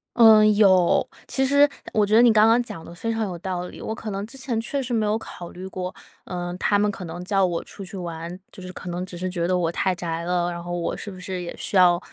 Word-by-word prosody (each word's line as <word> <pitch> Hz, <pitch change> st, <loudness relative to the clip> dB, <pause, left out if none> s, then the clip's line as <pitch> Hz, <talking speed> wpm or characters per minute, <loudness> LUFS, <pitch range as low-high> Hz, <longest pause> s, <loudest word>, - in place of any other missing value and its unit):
嗯， 220 Hz, -2 st, +8 dB
有。 190 Hz, -4 st, +4 dB, 0.2 s
其 265 Hz, -, 0 dB
实 285 Hz, +2 st, +5 dB, 0.2 s
我 215 Hz, -2 st, +3 dB
觉 210 Hz, +2 st, +2 dB
得 230 Hz, -, +8 dB
你 240 Hz, -1 st, +7 dB
刚 215 Hz, 0 st, +5 dB
刚 230 Hz, +2 st, +5 dB
讲 165 Hz, -9 st, -8 dB
得 170 Hz, -, -10 dB
非 230 Hz, +6 st, -3 dB
常 225 Hz, 0 st, -1 dB
有 190 Hz, -4 st, -3 dB
道 180 Hz, 0 st, -3 dB
理， -, -, -11 dB
我 220 Hz, -, -4 dB
可 215 Hz, -1 st, -6 dB
能 195 Hz, +1 st, -3 dB
之 270 Hz, +4 st, -10 dB
前 245 Hz, -3 st, -2 dB
确 275 Hz, +5 st, -2 dB
实 250 Hz, -1 st, -4 dB
没 220 Hz, -2 st, +1 dB
有 210 Hz, +1 st, +1 dB
考 175 Hz, -5 st, -9 dB
虑 185 Hz, +1 st, -9 dB
过， 185 Hz, -1 st, -5 dB, 0.3 s
呃， 175 Hz, -1 st, -4 dB
他 205 Hz, -, +2 dB
们 210 Hz, +1 st, +2 dB
可 185 Hz, -, -8 dB
能 175 Hz, +2 st, -7 dB
叫 195 Hz, 0 st, +2 dB
我 175 Hz, -2 st, 0 dB
出 200 Hz, -, -10 dB
去 195 Hz, +1 st, -8 dB
玩， 170 Hz, 0 st, -6 dB
就 195 Hz, -, -11 dB
是 185 Hz, 0 st, -7 dB
可 185 Hz, -, -7 dB
能 175 Hz, +1 st, -3 dB
只 185 Hz, -1 st, -8 dB
是 185 Hz, +2 st, -3 dB
觉 175 Hz, -2 st, -1 dB
得 180 Hz, 0 st, +2 dB
我 170 Hz, -2 st, 0 dB
太 185 Hz, +1 st, 0 dB
宅 165 Hz, -1 st, -3 dB
了。 175 Hz, 0 st, 0 dB
然 170 Hz, 0 st, -6 dB
后 175 Hz, -, -6 dB
我 175 Hz, -1 st, -2 dB
是 -, -, -6 dB
不 185 Hz, -2 st, -10 dB
是 185 Hz, 0 st, -4 dB
也 175 Hz, -, -6 dB
需 -, -, -3 dB
要 175 Hz, -2 st, +6 dB
185 Hz, 295 characters per minute, -24 LUFS, 175-215 Hz, 0.3 s, 嗯